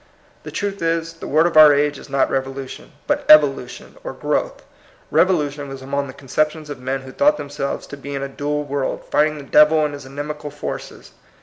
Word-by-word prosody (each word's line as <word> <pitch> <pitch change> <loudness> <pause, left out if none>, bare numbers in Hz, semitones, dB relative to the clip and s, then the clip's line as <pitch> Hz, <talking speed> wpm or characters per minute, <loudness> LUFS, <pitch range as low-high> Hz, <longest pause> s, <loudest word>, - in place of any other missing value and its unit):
The - - -9
truth 200 -2 -4
is, 165 0 -1
the 165 - -9
word 155 +3 +3
of 170 - 0
our 155 -1 +9
age 145 0 +1
is - - -13
not 135 0 +1
revolution, 135 0 -5
but - - 0
evolution 145 -4 +4
or - - -5
growth. - - -2 0.5
Rev 185 - +5
olution 145 -5 -1
was 135 -1 -8
among 140 +1 -2
the 130 - -9
conceptions 150 +3 -2
of 140 - -7
men 130 +1 -3
who 130 0 -11
thought 295 - +3
themselves 140 -1 -4
to 145 - -9
be 140 0 -7
in 135 - -3
a - - -2
dual 145 +2 -3
world, 140 -2 -3
fighting 150 +1 +2
the 145 - -8
Devil 150 +2 +5
and 150 - -3
his 140 -2 -9
inimical 145 +2 -6
forces. 145 0 -7
145 Hz, 205 wpm, -20 LUFS, 135-155 Hz, 0.5 s, our